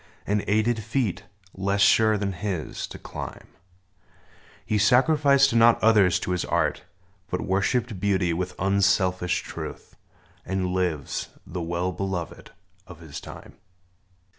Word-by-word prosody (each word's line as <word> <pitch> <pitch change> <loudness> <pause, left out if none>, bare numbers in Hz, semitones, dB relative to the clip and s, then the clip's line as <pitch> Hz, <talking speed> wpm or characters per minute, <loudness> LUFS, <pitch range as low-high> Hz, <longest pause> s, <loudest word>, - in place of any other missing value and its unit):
And 105 0 0
aided 110 +2 +1
feet, 110 -4 -2 0.3
less 100 +1 -1
sure 110 +1 +5
than 100 -1 -2
his, 90 -3 -4
to - - -9
climb: - - -8 1.2
He 105 - 0
sacrificed 135 +3 +4
not 115 0 +5
others 105 -6 +5
to - - -3
his 90 -1 0
art. - - -1 0.4
But 90 - -2
worshiped 100 +3 0
beauty 95 -3 +1
with 90 +1 -3
unselfish 95 -2 +1
truth, - - -8 0.5
And 95 -1 -2
lives, 90 -6 -2 0.2
the 90 0 -5
well 85 +2 -2
beloved 95 -2 -5 0.4
of 95 -4 -12
his 80 -4 -9
time - - -12
95 Hz, 125 wpm, -25 LUFS, 90-110 Hz, 1.2 s, sure